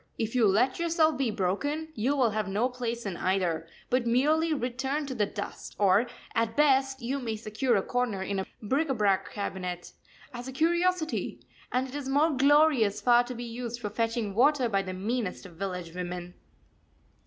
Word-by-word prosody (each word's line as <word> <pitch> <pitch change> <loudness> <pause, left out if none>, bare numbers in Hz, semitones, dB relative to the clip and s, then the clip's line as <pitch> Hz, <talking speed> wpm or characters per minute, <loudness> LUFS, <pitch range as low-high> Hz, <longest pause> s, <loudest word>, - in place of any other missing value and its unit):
If 225 0 -2
you 240 -4 +4
let 225 - +2
yourself 325 -2 +2
be 260 -2 0
broken, 225 - -1
you 255 +5 0
will 250 -5 +3
have 215 -1 -1
no 210 +6 +1
place 235 -2 -4
in 195 -3 -3
either, 180 -4 0 0.2
but 250 -1 +2
merely 305 +7 +3
return 265 +2 -1
to 275 - -4
the 210 -5 +1
dust; - - -7
or, 200 +4 +4 0.3
at 230 -1 0
best, 270 -3 +3
you 265 +4 -1
may 230 -4 -3
secure 220 +3 0
a 195 - +2
corner 245 -6 -1
in 195 0 -2
a 190 - -3 0.2
bric 280 +9 0
a 270 - +1
brac 200 -3 +1
cabinet 180 -3 -5 0.4
as 240 +1 -7
a - - -5
curiosity, 340 +3 0 0.3
and 255 +1 0
it 260 - -11
is 285 -2 -4
more 295 +4 +3
glorious 275 -6 +4
far 240 -1 +5
to 250 0 -6
be 240 - -5
used 240 0 -5
for 210 -3 -4
fetching 230 -1 -1
water 260 +3 +4
by 200 -3 +1
the 185 -1 -5
meanest 205 +1 -3
of 180 - -11
village 180 -3 -4
women. 180 0 -5
240 Hz, 190 wpm, -28 LUFS, 200-270 Hz, 0.4 s, far